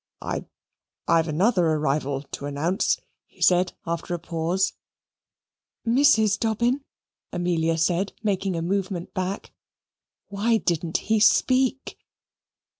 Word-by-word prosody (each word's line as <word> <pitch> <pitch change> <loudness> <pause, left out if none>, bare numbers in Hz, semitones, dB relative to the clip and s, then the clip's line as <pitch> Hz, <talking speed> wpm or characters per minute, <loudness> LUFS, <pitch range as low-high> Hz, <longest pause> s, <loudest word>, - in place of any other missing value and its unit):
"I - - -4 0.6
I've 165 0 +3
another 180 +5 +2
arrival 145 -2 -1
to 140 - -5
announce," 160 +8 0 0.3
he - - -28
said 180 0 +3
after 170 +1 -3
a - - -3
pause. 170 +3 -1 1.1
"Mrs. 230 -4 +4
Dobbin?" 235 +5 0 0.5
Amelia 170 -2 0
said, 175 +4 0
making 195 -3 0
a 165 - -2
movement 185 -1 -2
back 185 +1 -4 0.7
why 215 +3 +1
didn't 170 -4 -1
he 220 0 0
speak? 260 +5 +2
185 Hz, 110 wpm, -24 LUFS, 165-215 Hz, 1.1 s, Mrs